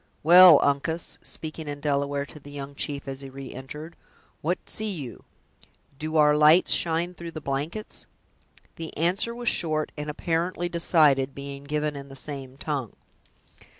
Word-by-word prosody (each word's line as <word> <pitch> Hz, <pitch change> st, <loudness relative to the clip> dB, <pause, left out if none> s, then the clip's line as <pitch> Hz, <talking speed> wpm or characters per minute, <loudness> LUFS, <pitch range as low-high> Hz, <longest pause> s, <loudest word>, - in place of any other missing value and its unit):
Well, 175 Hz, -1 st, +9 dB
Uncas!" 155 Hz, +4 st, -1 dB
speaking 155 Hz, 0 st, -7 dB
in 145 Hz, 0 st, -5 dB
Delaware 140 Hz, -1 st, 0 dB
to 150 Hz, -, -12 dB
the 145 Hz, -, -13 dB
young 140 Hz, -1 st, -7 dB
chief 140 Hz, 0 st, -4 dB
as 135 Hz, 0 st, -5 dB
he 135 Hz, -, -8 dB
re 135 Hz, 0 st, -9 dB
entered, 150 Hz, +6 st, -8 dB, 0.5 s
"what 175 Hz, +4 st, 0 dB
see 215 Hz, 0 st, -3 dB
you? 145 Hz, -, -7 dB, 0.7 s
do 155 Hz, 0 st, -4 dB
our 150 Hz, -1 st, +6 dB
lights 155 Hz, +4 st, +6 dB
shine 170 Hz, +1 st, +2 dB
through 170 Hz, -1 st, -8 dB
the 165 Hz, -, -7 dB
blankets?" 150 Hz, +9 st, -4 dB, 0.7 s
The 165 Hz, -1 st, -7 dB
answer 185 Hz, +8 st, 0 dB
was 240 Hz, 0 st, -6 dB
short, 155 Hz, -5 st, +1 dB
and 150 Hz, 0 st, -5 dB
apparently 170 Hz, +3 st, -1 dB
decided, 150 Hz, -6 st, +3 dB
being 140 Hz, 0 st, -7 dB
given 150 Hz, 0 st, -1 dB
in 140 Hz, 0 st, -8 dB
the 135 Hz, -, -10 dB
same 135 Hz, -1 st, -6 dB
tongue. 140 Hz, -7 st, -3 dB
150 Hz, 155 wpm, -26 LUFS, 140-165 Hz, 0.7 s, Well